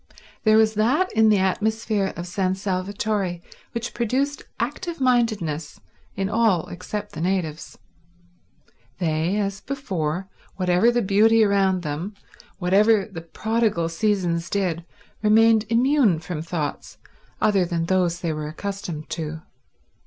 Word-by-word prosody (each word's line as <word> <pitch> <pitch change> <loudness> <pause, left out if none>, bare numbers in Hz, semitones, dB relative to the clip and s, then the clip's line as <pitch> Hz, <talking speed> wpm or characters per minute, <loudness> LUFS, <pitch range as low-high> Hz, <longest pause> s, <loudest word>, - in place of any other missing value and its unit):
There 215 0 +6
was 220 0 +4
that 250 - +2
in 220 0 +5
the 210 - +5
atmosphere 210 +1 0
of 170 - -4
San 185 +1 -1
Salvatore 195 -1 -2 0.3
which 235 0 -4
produced 265 +5 -1 0.2
active 345 -3 -3
mindedness 215 - 0 0.4
in 195 - -1
all 210 -5 +2
except 205 +4 -6
the 155 - -7
natives. 175 -4 -2 1.2
They, 165 +2 0
as 200 -1 -2
before, 190 - -3 0.3
whatever 185 +4 +3
the 240 0 +1
beauty 220 +3 +4
around 195 -3 +2
them, 160 +7 -4 0.4
whatever 200 +3 +3
the 185 -6 -8
prodigal 215 0 0
seasons 170 -2 0
did, 180 -4 -1 0.4
remained 220 +1 +5
immune 240 - +3
from 160 0 -5
thoughts 160 -2 -4 0.4
other 205 -3 +3
than 170 -1 -1
those 175 -1 +1
they 165 -3 -1
were 150 -1 -4
accustomed 170 -2 -5
to. 160 0 -4
195 Hz, 125 wpm, -23 LUFS, 170-220 Hz, 1.2 s, There